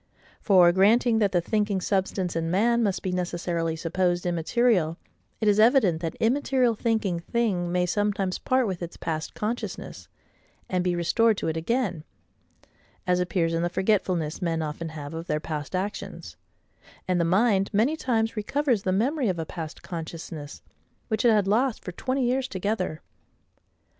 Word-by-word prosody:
For, 180 -4 +6
granting 220 +5 +4
that 205 -3 +2
the 175 - +2
thinking 205 +1 0
substance 190 -2 -1
in 165 0 -1
man 235 +6 +2
must 200 -4 0
be 185 - -1
necessarily 175 -2 -2
supposed 175 +2 0
immaterial, 175 0 +1 0.4
it 220 - 0
is 205 0 +4
evident 215 - +4
that 165 -2 -3
immaterial 255 0 +2
thinking 215 -6 0
thing 180 -2 -1
may 180 0 +2
sometimes 200 0 -1
part 255 -1 +1
with 185 -4 -3
its 170 0 -6
past 155 -1 -4
consciousness, 225 +3 -5 0.6
and 180 -2 0
be 180 -1 0
restored 210 +6 +2
to - - -2
it 160 - -2
again: 180 -1 -1 1.0
as 180 0 +2
appears 170 -2 0
in 165 - 0
the 175 - 0
forgetfulness 185 -5 0
men 165 -2 0
often 155 +2 -4
have 150 -1 -7
of 165 +1 -6
their 150 - 0
past 155 +2 -5
actions; 195 +3 -5 0.7
and 180 -1 +2
the - - +3
mind 195 +3 +2
many 225 +9 +2
times 230 -7 0
recovers 245 +1 0
the 190 - -1
memory 245 +6 +1
of 180 - -1
a 165 - -3
past 160 -1 -7
consciousness, 160 -3 -7 0.5
which 220 -2 0
it 240 - +6
had 210 -3 +3
lost 235 +4 +1
for 180 - -4
twenty 260 +8 -2
years 260 +2 0
together. 185 -5 -2
185 Hz, 165 wpm, -26 LUFS, 170-225 Hz, 1.0 s, For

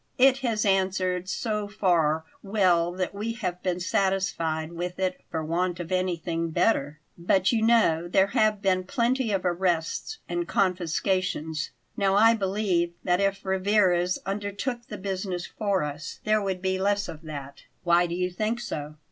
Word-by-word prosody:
"It 265 +1 +5
has 230 -5 0
answered 185 -2 +1
so 210 0 -2
far 165 -6 +1 0.2
well 185 -4 +2
that 185 +1 -2
we 215 +3 -3
have 180 -6 -4
been 180 -1 -1
satisfied 180 -4 0
with 175 +1 -4
it 185 -1 -1
for 160 -1 -3
want 175 +2 -1
of 175 +1 -6
anything 170 -2 -1
better; 150 -5 +1 0.2
but 185 +2 +2
you 230 -2 +1
know 220 -8 +3
there 190 +2 +4
have 215 -1 +2
been 185 -1 +2
plenty 240 +3 0
of 195 -2 -1
arrests 175 -2 -1
and 175 0 -2
confiscations. 180 -3 0 0.3
Now 195 -1 +2
I 225 +3 +6
believe 190 -4 0
that 180 +1 +2
if 195 0 0
Rivarez 190 -2 +2
undertook 205 +5 -3
the 210 - -6
business 190 -2 -3
for 200 -5 -1
us, 150 +1 -6
there 215 0 +2
would 190 -2 -3
be 190 0 0
less 205 +1 +1
of 155 - -8
that." 140 -3 -8 0.2
"Why 175 0 +4
do 170 - -3
you 180 0 -1
think 215 +6 -1
so?" 150 -9 -5
185 Hz, 160 wpm, -26 LUFS, 175-205 Hz, 0.3 s, I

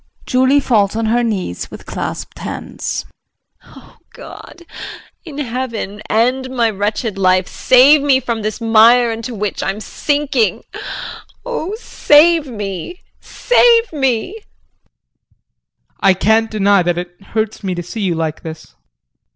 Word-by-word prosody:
JULIE 260 +3 +3
[Falls 215 -7 +1
on 225 0 -1
her 235 +2 +2
knees 210 -6 -3
with - - -11
clasped - - -6
hands]. - - -5 0.6
Oh, - - -17 0.2
God 345 - -12 0.6
in 300 -4 -9
heaven, 235 -6 -4
end 255 +4 +1
my 235 -3 +1
wretched 205 +1 -3
life, 185 -1 +3
save 270 +4 +5
me 275 -2 +3
from 235 -3 -3
this 215 +2 -3
mire 230 +1 +5
into 230 +2 -5
which 210 -1 -3
I'm 195 +2 -2
sinking 285 0 -1 0.8
Oh 430 -6 -3
save 320 -5 +4
me, 205 - -6 0.2
save 470 -4 +3
me. 270 - 0
JEAN. 440 -1 -11 1.6
I 195 - +4
can't 220 +4 +2
deny 200 -2 +3
that 175 0 0
it 175 +1 -7
hurts 220 +2 -3
me 185 -2 -2
to 175 - -4
see 215 +6 -6
you 185 -4 0
like 160 -1 -3
this. 160 - -10
225 Hz, 135 wpm, -17 LUFS, 200-265 Hz, 1.6 s, save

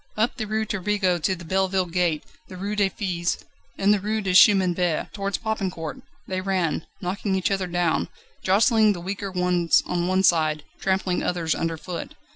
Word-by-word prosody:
Up 225 +4 +1
the 220 -3 -3
Rue 220 +1 -1
Turbigo 200 -3 0
to 190 +5 +1
the 170 -1 -11
Belleville 190 +1 +1
gate, 170 -3 +1 0.2
the 185 - -10
Rue 200 +3 -3
des 200 -2 +2
Filles, 175 -4 -2 0.4
and 200 +1 +4
the 210 - +1
Rue 215 +3 -1
du 190 -3 -1
Chemin 190 -2 +6
Vert, 175 -3 -1
towards 200 -1 -2
Popincourt, 190 -7 -3 0.3
they 185 -1 -2
ran, 185 -5 -1
knocking 195 +2 -2
each 190 +1 0
other 195 -2 0
down, 175 -1 0 0.3
jostling 215 +2 +4
the 180 - -7
weaker 195 +3 -4
ones 180 -3 +2
on 175 0 -1
one 185 +1 +2
side, 155 -4 +3 0.2
trampling 190 -1 0
others 170 -2 0
underfoot. 165 +1 -4
185 Hz, 175 wpm, -24 LUFS, 175-200 Hz, 0.4 s, Chemin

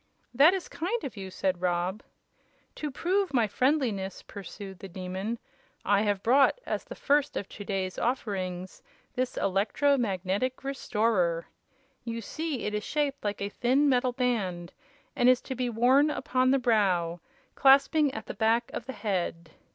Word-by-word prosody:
"That 300 +9 +6
is 375 - -4
kind 410 +8 -3
of 260 - -5
you," 190 -2 -6
said 185 -1 -1
Rob. 180 +3 0 0.7
"To 300 - -4
prove 365 +3 0
my 235 -3 +4
friendliness," 225 -5 0
pursued 195 -1 -9
the 195 - -8
Demon, 190 +5 -4 0.5
"I 200 0 +3
have 205 -2 0
brought, 275 - +4
as - - -2
the - - -8
first 290 0 +1
of 200 - -4
to 205 - -8
day's 190 -2 -3
offerings 190 -7 -3 0.3
this 255 -1 -2
Electro 210 +9 +2
Magnetic 205 +4 -1
Restorer. 210 -10 0 0.6
You 230 -1 -4
see 305 +3 -4
it 210 - -2
is 210 0 -2
shaped 290 0 -1
like 205 -1 -2
a 200 - -2
thin 255 +7 +2
metal 250 -1 +2
band, 195 -9 -1 0.4
and 245 - +4
is 255 -1 +5
to 265 - -5
be 250 -1 -2
worn 255 +6 +4
upon 255 -3 +1
the 270 - +4
brow, 190 -9 +1 0.3
clasping 280 +2 +5
at 220 -3 -7
the - - -6
back 230 +2 +1
of 240 - -5
the 265 - -4
head. 175 -5 -2
230 Hz, 160 wpm, -28 LUFS, 190-265 Hz, 0.7 s, That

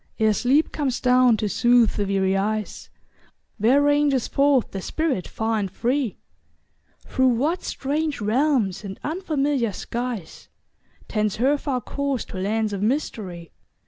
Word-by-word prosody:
Ere 220 -1 +3
sleep 265 +9 +2
comes 270 -5 -1
down 250 -2 +4
to 210 - -1
soothe 240 +1 +4
the 205 - -2
weary 195 -1 +1
eyes, 210 +2 -2 0.7
Where 255 +7 +4
ranges 290 -3 +2
forth 275 -3 +2
the 195 - -5
spirit 285 - -2
far 220 0 -1
and 195 -2 -2
free? 245 +3 -1 0.9
Through 260 -1 +1
what 285 +9 +1
strange 295 +2 -2
realms 220 -3 +1
and 195 -1 -7
unfamiliar 290 - -1
skies. 235 -3 -5 0.6
Tends 215 -2 -1
her 265 +6 +2
far 275 -3 -2
course 280 +1 -3
to - - -9
lands 215 +2 -1
of 195 - -3
mystery? 205 - -3
240 Hz, 140 wpm, -23 LUFS, 210-280 Hz, 0.9 s, down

